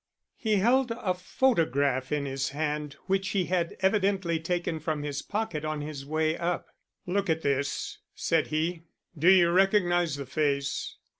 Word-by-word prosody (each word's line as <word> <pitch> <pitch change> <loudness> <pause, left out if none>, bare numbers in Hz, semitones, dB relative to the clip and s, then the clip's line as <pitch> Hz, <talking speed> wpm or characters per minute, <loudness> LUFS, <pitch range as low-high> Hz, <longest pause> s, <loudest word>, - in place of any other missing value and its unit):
He 220 -2 0
held 245 +6 +3
a 230 -5 -1
photograph 145 - +1
in 145 -1 0
his 135 0 -2
hand 150 0 -3
which 190 0 0
he 185 - +2
had 175 -1 -1
evidently 190 -4 +2
taken 170 0 -2
from 155 -1 -2
his 145 -1 -3
pocket 205 -8 -3
on 155 -1 -2
his 145 -2 -6
way 155 +1 +1
up. 175 0 -1 0.4
"Look 195 +1 -1
at 160 0 0
this," 140 -1 -1 0.2
said - - +1
he. 160 +2 -1 0.3
"Do 165 +4 +4
you 175 -3 +6
recognize 175 -4 +3
the 140 -1 -5
face?" 140 0 -1
165 Hz, 155 wpm, -28 LUFS, 145-190 Hz, 0.4 s, you